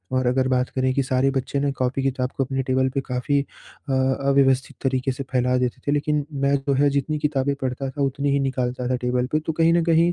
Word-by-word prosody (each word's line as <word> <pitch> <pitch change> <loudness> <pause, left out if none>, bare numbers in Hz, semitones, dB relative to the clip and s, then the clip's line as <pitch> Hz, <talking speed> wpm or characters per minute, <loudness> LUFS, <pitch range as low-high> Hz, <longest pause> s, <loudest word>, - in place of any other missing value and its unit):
और 130 -1 +1
अगर 130 +1 +2
बात 125 0 +1
करें 130 0 +1
कि 140 - +1
सारे 130 +1 +1
बच्चे 135 +1 -2
ना 140 0 +1
कॉपी-किताब 130 0 -1
को 135 - +2
अपने 135 +1 -2
टेबल 130 0 +2
पे 135 - 0
काफ़ी 125 +3 0
अ, 140 0 -10
अव्यवस्थित 135 0 +2
तरीके 135 0 0
से 135 +2 -5
फ़ैला 125 0 +2
देते 125 -1 -2
थे। - - +3
लेकिन 150 0 0 0.2
मैं 140 0 +3
जो 140 0 -1
है 145 +2 +4
जितनी 140 +2 -1
किताबें 140 -2 0
पढ़ता 130 +1 -2
था 145 +2 -5
उतनी 140 +1 0
ही 140 - +2
निकालता 125 -2 -2
था 130 - +2
टेबल 125 0 0
पे। 155 - +2
तो 155 +1 -3
कहीं 165 +1 +3
न 170 - +3
कहीं 165 +1 +3
135 Hz, 230 wpm, -23 LUFS, 130-140 Hz, 0.2 s, है